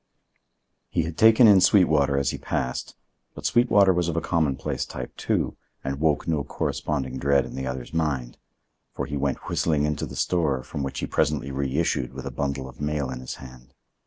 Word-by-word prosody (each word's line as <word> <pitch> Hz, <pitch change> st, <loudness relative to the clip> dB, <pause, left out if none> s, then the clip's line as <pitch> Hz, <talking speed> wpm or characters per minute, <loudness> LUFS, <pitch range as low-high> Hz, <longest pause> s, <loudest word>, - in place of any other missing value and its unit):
He 85 Hz, -, 0 dB
had 80 Hz, 0 st, -5 dB
taken 110 Hz, +4 st, +7 dB
in 100 Hz, -3 st, +7 dB
Sweetwater 75 Hz, -9 st, +4 dB
as 70 Hz, 0 st, +1 dB
he -, -, -6 dB
passed, 65 Hz, -1 st, -3 dB, 0.4 s
but -, -, -9 dB
Sweetwater 100 Hz, -5 st, +4 dB
was 90 Hz, -1 st, 0 dB
of 85 Hz, -, -2 dB
a -, -, +4 dB
commonplace 80 Hz, -5 st, -1 dB
type, 65 Hz, -2 st, -7 dB
too, -, -, -1 dB, 0.3 s
and 70 Hz, +1 st, -3 dB
woke 75 Hz, -2 st, +1 dB
no 80 Hz, -3 st, 0 dB
corresponding 65 Hz, -2 st, -3 dB
dread 70 Hz, -1 st, +3 dB
in -, -, -9 dB
the 65 Hz, 0 st, -4 dB
other's 65 Hz, +1 st, -5 dB
mind; 70 Hz, -7 st, -2 dB, 0.6 s
for -, -, -2 dB
he 70 Hz, -, -5 dB
went 70 Hz, 0 st, -2 dB
whistling 75 Hz, -3 st, +1 dB
into 75 Hz, -1 st, -2 dB
the -, -, -9 dB
store, 75 Hz, -8 st, 0 dB
from 70 Hz, -, -6 dB
which 70 Hz, -1 st, -3 dB
he -, -, -1 dB
presently 75 Hz, -2 st, 0 dB
reissued 70 Hz, -1 st, -1 dB
with -, -, -7 dB
a -, -, -4 dB
bundle 70 Hz, -2 st, -3 dB
of 65 Hz, +2 st, -12 dB
mail 75 Hz, -3 st, -1 dB
in 65 Hz, -, -5 dB
his 65 Hz, -, -6 dB
hand. 65 Hz, -1 st, -13 dB
70 Hz, 190 wpm, -25 LUFS, 65-80 Hz, 0.6 s, taken